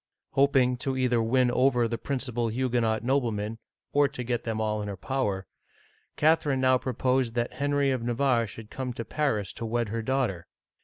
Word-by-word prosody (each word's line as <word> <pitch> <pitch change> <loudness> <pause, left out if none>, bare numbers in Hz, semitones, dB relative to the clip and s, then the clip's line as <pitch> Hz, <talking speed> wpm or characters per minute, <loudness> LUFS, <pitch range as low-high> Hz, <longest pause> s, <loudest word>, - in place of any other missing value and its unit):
Hoping 135 -3 +3
either 130 -2 +1
to - - +2
win 125 +2 +2
over 125 -2 +3
the 115 0 -3
principal 125 -4 -2
Huguenot 115 -2 0
noble 130 -1 +1
men, 105 +2 -4 0.3
or 145 0 +5
to 135 -2 -6
get 120 -1 -2
them 110 -1 -2
all 105 -1 0
in 105 - -4
her 100 -1 -5
power, 100 -4 -2 0.7
Catherine 150 -3 +3
now 130 0 +4
pro 130 - -3
posed 125 -1 +1
that 120 0 -1
Henry 140 0 +1
of 130 -2 -1
Navarre 120 0 +1
should 105 +1 -11
come 130 -2 -4
to 115 - -5
Paris 110 -11 -1
to - - -7
wed 115 0 -1
her 115 +2 -2
daughter. 115 -8 -1
120 Hz, 190 wpm, -27 LUFS, 115-130 Hz, 0.7 s, or